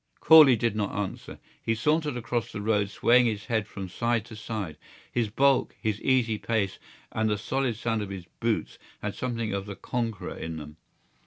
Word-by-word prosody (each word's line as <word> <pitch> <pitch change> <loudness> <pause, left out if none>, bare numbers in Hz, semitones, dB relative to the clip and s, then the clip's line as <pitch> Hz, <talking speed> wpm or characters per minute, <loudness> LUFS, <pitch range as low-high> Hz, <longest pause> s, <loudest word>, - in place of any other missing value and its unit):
Corley 155 -5 +8
did 115 -1 0
not 105 -2 -2
answer. 100 -2 -5 0.2
He 115 - 0
sauntered 150 +2 +1
across 115 -2 -2
the 105 - -5
road 105 -1 +1
swaying 120 +4 +4
his 110 -1 -2
head 110 -4 0
from 95 -1 -6
side 115 +3 0
to 115 - -10
side. 105 -7 -5 0.3
His 115 -3 0
bulk, 135 +4 +2
his 110 -2 -2
easy 120 -5 +2
pace, 100 -2 -1 0.3
and 110 0 0
the 105 - +1
solid 130 +3 -1
sound 115 0 -1
of 100 - -4
his 95 -3 -7
boots 115 -2 -1 0.2
had - - -2
something 115 -4 -3
of 100 0 -3
the 100 - -6
conqueror 115 -3 -3
in 80 0 -5
them. 75 0 -9
110 Hz, 185 wpm, -27 LUFS, 105-120 Hz, 0.3 s, Corley